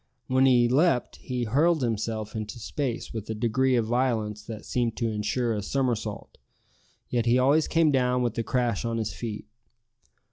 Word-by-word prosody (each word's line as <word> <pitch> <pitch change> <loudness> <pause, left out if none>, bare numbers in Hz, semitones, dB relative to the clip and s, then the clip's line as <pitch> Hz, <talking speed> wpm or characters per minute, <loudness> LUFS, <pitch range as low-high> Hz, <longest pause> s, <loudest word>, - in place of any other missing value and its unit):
When 130 +1 +3
he 120 -2 +5
leaped, 135 +1 +2
he 125 -1 -3
hurled 145 +7 +2
himself 110 -2 -2
into 110 +2 -5
space 120 +1 -4
with 110 -2 -6
a 110 - -2
degree 125 +4 +1
of 115 -2 +2
violence 110 -3 0
that 110 -2 -8
seemed 120 -2 -1
to 115 - 0
insure 110 +3 -1
a 105 - -2
somersault; 115 -2 -2 0.7
yet 120 -1 0
he 120 +2 +4
always 140 +5 +3
came 165 -2 +3
down 125 -2 +2
with 120 -2 -1
a - - 0
crash 120 -3 0
on 115 -1 -2
his 110 -4 -2
feet. 110 0 -6
120 Hz, 175 wpm, -26 LUFS, 110-130 Hz, 0.7 s, he